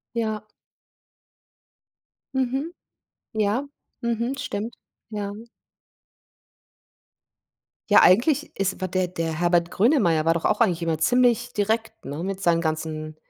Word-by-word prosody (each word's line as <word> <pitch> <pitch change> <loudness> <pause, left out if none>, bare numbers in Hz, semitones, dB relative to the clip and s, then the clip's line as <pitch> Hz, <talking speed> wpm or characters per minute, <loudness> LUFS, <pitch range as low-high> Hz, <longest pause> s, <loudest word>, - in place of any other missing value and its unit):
Ja. 215 -2 -2 1.9
Mhm. 265 +6 -1 0.6
Ja, 220 +6 0 0.3
mhm, 235 +3 -1
stimmt. 225 -2 -4 0.4
Ja. 205 -1 -4 2.6
Ja, - - +7
eigentlich 280 - +4
ist 195 -1 -1
wa 185 - 0
der 185 0 0
der 165 -2 -3
Herbert 175 -1 +2
Grönemeyer 185 - +3
war 165 - +4
doch 165 - -3
auch 215 - +2
eigentlich 180 -7 +2
immer 165 -2 0
ziemlich 245 +5 +2
direkt, 220 +2 -1
ne, 145 +4 -5
mit 195 +1 -4
seinen 170 -2 +3
ganzen 155 -1 -3
200 Hz, 115 wpm, -24 LUFS, 170-235 Hz, 2.6 s, Ja